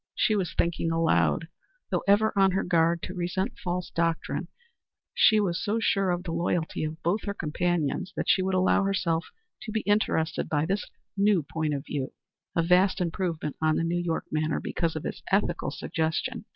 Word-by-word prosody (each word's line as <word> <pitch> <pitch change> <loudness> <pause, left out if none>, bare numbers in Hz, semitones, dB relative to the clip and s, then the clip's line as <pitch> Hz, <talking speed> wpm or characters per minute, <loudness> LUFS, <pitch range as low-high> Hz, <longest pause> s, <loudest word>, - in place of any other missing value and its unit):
She 215 - +2
was 185 -6 -1
thinking 170 -1 0
aloud. 165 0 +2 0.4
Though - - +1
ever 210 +2 +4
on 195 -1 +4
her 190 - +1
guard 170 -1 +2
to 185 - -5
resent 190 +5 -2
false 180 -1 -2
doctrine, 165 -1 -1 0.7
she 215 -1 +5
was 180 -3 0
so 210 +4 0
sure 195 -4 +2
of 175 0 -1
the 170 - -4
loyalty 170 -1 -1
of 155 +1 -6
both 185 +6 0
her 200 - -3
companions 175 +1 -1
that - - -2
she 190 - +4
could 190 0 0
allow 185 +2 +3
herself 185 -4 0 0.3
to 220 - -6
be 220 0 0
interested 205 -6 +1
by 150 0 +1
this 195 +4 -2 0.3
new 200 -4 +3
point 155 0 -2
of 140 +2 -5
view 140 -3 -4 0.4
a 165 - +3
vast 180 +3 +4
improvement 165 -4 -2
on 155 -1 +3
the - - 0
New 175 +1 0
York 170 -2 -2
manner 155 0 0
because 165 -2 -2
of 155 - -4
its - - -5
ethical - - +1
suggestion. 170 +9 -2
175 Hz, 185 wpm, -27 LUFS, 160-195 Hz, 0.7 s, she